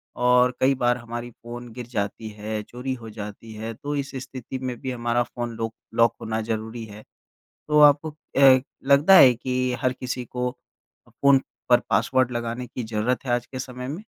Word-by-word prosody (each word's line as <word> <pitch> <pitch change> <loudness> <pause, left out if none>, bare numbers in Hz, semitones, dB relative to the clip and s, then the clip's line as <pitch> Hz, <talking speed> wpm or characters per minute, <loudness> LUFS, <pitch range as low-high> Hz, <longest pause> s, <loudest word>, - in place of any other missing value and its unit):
और 125 0 +4
कई 135 +1 +4
बार 120 -1 +2
हमारी 120 0 -6
फ़ोन 120 +1 -10
गिर 120 -1 -7
जाती 110 -1 -3
है, 105 0 -5
चोरी 125 +4 -5
हो 115 -3 -8
जाती 105 +1 -8
है। 110 +1 -5
तो 145 +6 -5
इस 140 -1 -3
स्थिति 130 0 -7
में 130 -1 -3
भी 130 - -3
हमारा 120 0 0
फ़ोन 120 -1 -6
लॉक 115 0 -3 0.2
लॉक 115 -1 +4
होना 110 0 -2
ज़रूरी 110 +1 -4
है, 105 0 -12 0.7
तो 150 0 +4
आपको 150 +1 +6
अ, 135 -3 +4 0.3
लगता 150 +8 +7
है 130 -9 +9
कि 125 +1 -1
हर 130 - +2
किसी 125 -1 -5
को 125 +1 -2
अ, 125 - -26
फ़ोन 140 -1 +4 0.3
पर 120 -1 +6
पासवर्ड 125 +5 +2
लगाने 120 +1 -3
की 120 0 -6
ज़रूरत 110 +4 -1
है - - -2
आज 120 0 0
के 130 - -7
समय 125 0 -6
में? 160 +9 -5
120 Hz, 190 wpm, -24 LUFS, 115-130 Hz, 0.7 s, है